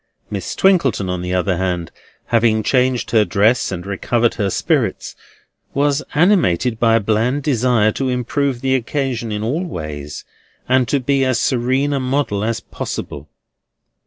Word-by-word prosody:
Miss - - -4
Twinkleton, 135 - +2
on 90 -1 -3
the 90 +1 -2
other 90 0 0
hand, 90 -2 -2 0.4
having 115 -2 +3
changed 125 0 +1
her 110 -2 +5
dress 110 +3 +2
and 90 -1 -5
recovered 115 +4 0
her 100 -4 -1
spirits, - - -1 0.6
was 145 +1 +2
animated 135 - +2
by 115 -1 +4
a - - +4
bland 115 +6 0
desire 120 -5 +2
to 130 +4 -2
improve 125 +1 -1
the 130 0 +1
occasion 130 -2 -2
in 105 0 -3
all 145 +11 -1
ways, 75 - -6 0.4
and 130 -1 +3
to 140 - +1
be 135 +1 +1
as 130 -3 +1
serene 130 +3 +1
a 140 - 0
model 130 -6 -1
as 115 +1 -1
possible. 70 +1 -6
120 Hz, 155 wpm, -18 LUFS, 105-135 Hz, 0.6 s, her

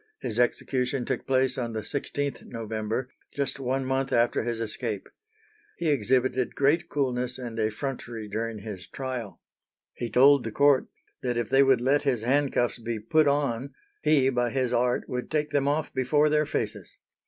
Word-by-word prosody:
His 110 - -3
execution 125 +1 0
took 130 - -3
place 130 0 +2
on 120 -2 -3
the 110 - -2
16th 140 +3 -3
November, 110 +2 -3 0.3
just 140 -1 -2
one 135 0 -1
month 135 +1 -1
after 120 -1 +2
his 115 0 -3
escape. 110 -2 -3 0.7
He 170 - 0
exhibited 130 -1 +1
great 160 +5 +2
coolness 125 -3 -1
and 120 -3 -6
effrontery 115 0 -3
during 110 +2 -3
his 100 -4 -7
trial. 125 -9 -5 0.5
He 120 - -4
told 135 +4 +6
the 115 - -4
court 140 +3 +4 0.3
that 120 -2 -1
if 120 -3 -1
they 135 - +6
would 135 -3 +4
let 135 +3 +3
his 125 -6 0
handcuffs 130 -2 +2
be 115 -1 -3
put 150 +8 +3
on 140 -2 0 0.3
he 135 -4 +4
by 125 -2 +1
his 130 0 0
art 125 +1 +1
would 125 0 -4
take 150 -1 -1
them 140 -1 +1
off 150 +2 0
before 145 +4 +3
their 150 0 +2
faces. - - -4
125 Hz, 165 wpm, -27 LUFS, 115-140 Hz, 0.7 s, told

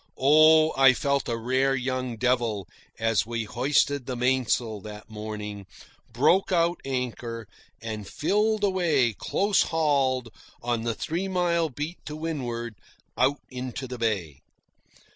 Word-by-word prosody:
Oh, 155 +3 +6
I 135 -1 +7
felt 140 -1 0
a 115 - -1
rare 130 +3 +1
young 130 -2 -2
devil, 115 -6 0 0.3
as 115 -1 +1
we 115 -1 -2
hoisted 130 +3 +1
the 130 - -3
big - - -7
mainsail 125 -4 +1
that 105 +1 -10
morning, 105 -2 -6 0.4
broke 160 +13 +3
out 170 -1 +2
anchor, 120 -4 -4 0.4
and 110 -3 -5
filled 210 +7 0
away 165 - +2
close 200 - +1
hauled 140 -6 +1 0.3
on 120 -1 -1
the 115 -1 -1
three 175 - -3
mile 175 -3 +1
beat 150 +6 -6
to 150 - -5
windward 125 -8 -4 0.4
out 135 +3 +2
into 130 +1 -5
the 125 -1 -7
bay. 95 -11 -2
130 Hz, 135 wpm, -26 LUFS, 115-155 Hz, 0.4 s, I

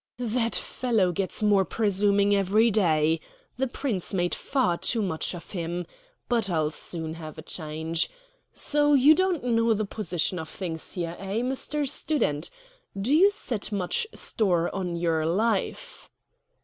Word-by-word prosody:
"That 235 -1 -1
fellow 220 -8 0
gets 190 +4 -1
more 205 -2 +4
presuming 200 0 +2
every 205 +4 +3
day. 160 -6 +2 0.4
The 265 +1 0
Prince 235 -8 -2
made 175 -1 0
far 255 -11 0
too 225 -3 +1
much 180 -1 0
of 175 - -11
him; 175 -1 -3 0.4
but 230 -5 +1
I'll 155 -3 0
soon 160 0 -2
have 160 -2 -9
a 155 - -8
change. 160 0 -2 0.4
So 295 0 +2
you 280 +3 +7
don't 370 -3 0
know 230 -2 +2
the 215 0 -1
position 180 -3 -2
of 160 -1 -7
things 165 -4 -5
here, 170 -2 -4
eh, 195 +4 -2
Mr. 270 +3 -2
Student? 175 - 0 0.5
Do 230 +8 0
you 370 +6 +6
set 245 - -2
much 205 - 0
store 175 -6 0
on 180 -3 -3
your 165 -2 0
life?" 205 +4 -1
195 Hz, 150 wpm, -26 LUFS, 170-235 Hz, 0.5 s, you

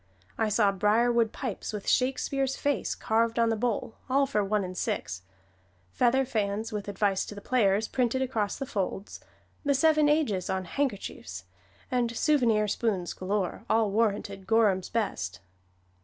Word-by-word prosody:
I 220 -1 0
saw 210 -1 +3
briarwood 225 +3 +2
pipes 255 -7 -4
with 210 -2 -6
Shakespeare's 270 +1 +1
face 285 -1 -1
carved 230 +1 +1
on 230 -1 +3
the 225 - +1
bowl, 225 -1 -2
all 275 +2 +3
for 235 -7 0
one 205 +1 0
and 185 0 -6
six; 90 - -3 0.7
feather 255 - +2
fans 215 -2 -2
with 210 -2 -4
advice 200 -1 +1
to 205 - -7
the - - -7
players 210 -2 +2
printed 255 +1 0
across 220 -6 -1
the 275 - -4
folds; 195 -3 -4 0.4
the 285 -1 +2
"Seven 305 +1 +4
Ages" 230 - +1
on 190 -1 -1
handkerchiefs; 195 - -3 0.5
and 240 -2 0
souvenir 235 -8 +3
spoons 195 -4 -1
galore, 195 +1 -2
all 220 -2 +3
warranted 200 -3 -1
Gorham's 210 -4 +3
best. 190 - -2
220 Hz, 150 wpm, -28 LUFS, 200-250 Hz, 0.7 s, Seven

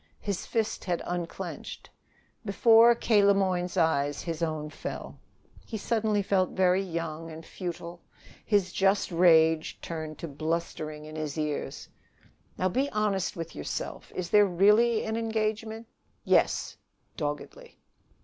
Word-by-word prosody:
His 200 -3 -4
fist 220 -1 -1
had 175 -2 -1
unclenched. 175 -1 -6 0.5
Before 225 +3 +6
K. 215 -3 +3
Le 200 0 +5
Moyne's 185 -2 0
eyes 145 -4 +1
his 165 -1 -4
own 155 -2 -2
fell. - - -7 0.4
He 225 - -5
felt 220 +1 -1 0.5
suddenly 185 0 +4
young 165 -3 -4
and 160 0 -9
futile; 170 -1 -6 0.4
his 200 -4 +1
just 195 0 +2
rage 160 -2 +4
turned 155 -2 -6
to 170 - -6
blustering 155 0 -3
in 155 0 -9
his 155 -1 -4
ears. 150 -2 -3 0.7
"Now, 185 - +1
be 265 +10 0
honest 210 -4 0
with 165 -1 -6
yourself. 75 - -5
Is 180 -1 -4
there 210 -1 +6
really 210 +5 +4
an 220 0 -2
engagement?" 220 0 -2 0.4
"Yes," - - +2 0.4
doggedly. 150 -1 -5
180 Hz, 130 wpm, -28 LUFS, 160-210 Hz, 0.7 s, Before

